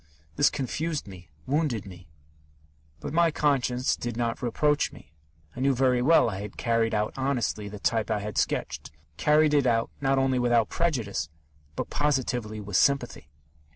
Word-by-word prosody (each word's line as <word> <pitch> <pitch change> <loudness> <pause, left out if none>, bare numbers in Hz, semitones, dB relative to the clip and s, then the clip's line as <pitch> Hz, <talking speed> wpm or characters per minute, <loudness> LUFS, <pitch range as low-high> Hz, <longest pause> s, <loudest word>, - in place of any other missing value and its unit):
This 145 - +4
confused 150 +1 -3
me, 90 -3 -12 0.2
wounded 140 -7 0
me; 90 -3 -12 0.9
but 145 - -6
my 170 0 +4
conscience 130 -5 +1
did 120 -1 -5
not 115 -1 -2
reproach 145 +5 +1
me. 75 - -16 0.4
I - - -8
knew 135 0 +2
very 125 -1 +2
well 160 +3 +5
I 100 -3 -4
had 105 -1 -8
carried 115 -2 +1
out 105 0 -1
honestly 125 -6 -1
the 105 - -8
type 110 +1 0
I 110 - +1
had 105 0 -6
sketched, - - -2 0.3
carried 150 - +3
it 140 -3 +3
out 115 -1 +1
not 135 0 +2
only 135 -1 +2
without 120 -3 +2
prejudice, 115 - -1 0.5
but - - -4
positively 125 -7 -1
with 100 -2 -2
sympathy. 125 - +1
120 Hz, 160 wpm, -27 LUFS, 105-140 Hz, 0.9 s, well